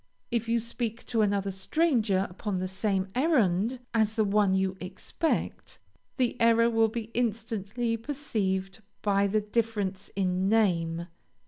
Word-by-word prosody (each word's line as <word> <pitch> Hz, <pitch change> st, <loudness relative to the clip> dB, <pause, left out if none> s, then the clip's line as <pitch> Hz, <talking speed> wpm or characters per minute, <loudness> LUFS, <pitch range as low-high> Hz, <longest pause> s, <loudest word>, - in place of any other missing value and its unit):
If 230 Hz, -1 st, -1 dB
you 235 Hz, -, +3 dB
speak 235 Hz, 0 st, -3 dB
to 225 Hz, -2 st, +1 dB
another 200 Hz, -1 st, +1 dB
stranger 210 Hz, -, +1 dB
upon 195 Hz, +2 st, -4 dB
the 185 Hz, +1 st, -2 dB
same 190 Hz, 0 st, -1 dB
errand 245 Hz, -, +2 dB
as 220 Hz, -1 st, +2 dB
the 220 Hz, -, +3 dB
one 200 Hz, -1 st, +3 dB
you 190 Hz, 0 st, 0 dB
expect, 185 Hz, -, -3 dB, 0.4 s
the 245 Hz, -2 st, 0 dB
error 230 Hz, 0 st, +5 dB
will 225 Hz, -1 st, +3 dB
be 225 Hz, 0 st, -5 dB
instantly 230 Hz, 0 st, -1 dB
perceived 215 Hz, -7 st, -2 dB, 0.2 s
by 200 Hz, -1 st, +3 dB
the 215 Hz, +2 st, +1 dB
difference 210 Hz, -3 st, -2 dB
in 185 Hz, -1 st, +1 dB
name. 170 Hz, -6 st, +2 dB
215 Hz, 135 wpm, -28 LUFS, 190-230 Hz, 0.4 s, error